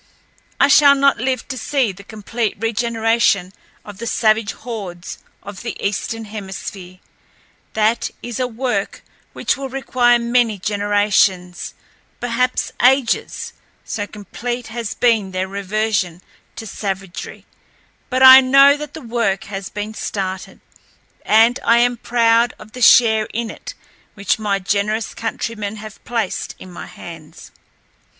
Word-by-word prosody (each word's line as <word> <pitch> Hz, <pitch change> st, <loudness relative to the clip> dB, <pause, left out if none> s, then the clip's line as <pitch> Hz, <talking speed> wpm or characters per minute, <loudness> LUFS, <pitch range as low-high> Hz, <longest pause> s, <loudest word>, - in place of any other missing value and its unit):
I -, -, +6 dB
shall 285 Hz, 0 st, +7 dB
not 275 Hz, 0 st, +3 dB
live 255 Hz, 0 st, -2 dB
to 260 Hz, -, -4 dB
see 260 Hz, -2 st, 0 dB
the 195 Hz, +1 st, -13 dB
complete 220 Hz, +2 st, -3 dB
regeneration 225 Hz, -3 st, +1 dB, 0.3 s
of 205 Hz, -1 st, -11 dB
the 235 Hz, -, -5 dB
savage 220 Hz, -2 st, +1 dB
hordes 195 Hz, -8 st, -7 dB, 0.2 s
of 200 Hz, -1 st, -9 dB
the 235 Hz, -, -5 dB
Eastern 220 Hz, +3 st, -3 dB
Hemisphere—that 205 Hz, +2 st, -5 dB
is 240 Hz, -1 st, -5 dB
a 255 Hz, -, 0 dB
work 235 Hz, -4 st, -3 dB, 0.3 s
which -, -, 0 dB
will 270 Hz, -1 st, -6 dB
require 250 Hz, -2 st, +2 dB
many 235 Hz, -2 st, +1 dB
generations, 205 Hz, -2 st, 0 dB, 0.4 s
perhaps 245 Hz, +1 st, -1 dB
ages, 255 Hz, -1 st, +1 dB, 0.3 s
so 205 Hz, -2 st, -4 dB
complete 235 Hz, +4 st, -6 dB
has 230 Hz, -2 st, -5 dB
been 225 Hz, -5 st, +2 dB
their 185 Hz, +1 st, -2 dB
reversion 195 Hz, -3 st, -2 dB, 0.3 s
to 225 Hz, -, -7 dB
savagery; 195 Hz, -3 st, -6 dB, 0.6 s
but 260 Hz, 0 st, +1 dB
I 260 Hz, 0 st, +11 dB
know 275 Hz, +2 st, +6 dB
that 300 Hz, -1 st, -8 dB
the 320 Hz, -, -8 dB
work 230 Hz, -5 st, -1 dB
has 195 Hz, 0 st, -5 dB
been 210 Hz, +1 st, -5 dB
started, 190 Hz, -3 st, -5 dB, 0.6 s
and 225 Hz, +3 st, +4 dB
I 230 Hz, -, +4 dB
am 245 Hz, +1 st, +3 dB
proud 230 Hz, 0 st, +2 dB
of 215 Hz, -, -14 dB
the 250 Hz, -, -9 dB
share 225 Hz, -2 st, +6 dB
in 230 Hz, -1 st, -2 dB
it -, -, -10 dB, 0.4 s
which 200 Hz, +2 st, 0 dB
my 205 Hz, -2 st, 0 dB
generous 205 Hz, +3 st, -1 dB
countrymen 220 Hz, -2 st, -4 dB
have 215 Hz, 0 st, -11 dB
placed 230 Hz, -5 st, -3 dB
in 185 Hz, -, -12 dB
my 175 Hz, -, -9 dB
hands. 165 Hz, -3 st, -12 dB
220 Hz, 130 wpm, -19 LUFS, 200-240 Hz, 0.6 s, I